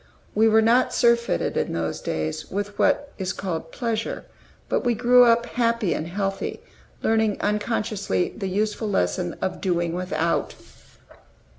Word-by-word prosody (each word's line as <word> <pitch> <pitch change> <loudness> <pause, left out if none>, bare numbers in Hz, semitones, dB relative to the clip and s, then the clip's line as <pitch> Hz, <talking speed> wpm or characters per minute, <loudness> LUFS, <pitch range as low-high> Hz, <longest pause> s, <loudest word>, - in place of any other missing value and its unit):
We 220 +2 +4
were 220 0 +5
not 240 +3 +3
surfeited, 235 0 +2
in - - -1
those 85 -1 -2
days, 80 0 -3
with 205 +1 -4
what 285 0 +2
is 185 -1 -1
called 165 -4 -4
pleasure; 230 -3 -3 0.4
but - - 0
we 240 -2 +1
grew 245 +2 +6
up 235 0 +4
happy 230 -5 0
and 155 - -3
healthy, 195 +2 -3 0.4
learning 220 -2 +2
unconsciously 210 - -1
the 195 - -3
useful 210 +2 -1
lesson 90 - 0
of 190 - -2
doing 175 -3 0
without. 170 -2 -1
210 Hz, 140 wpm, -24 LUFS, 180-230 Hz, 0.4 s, grew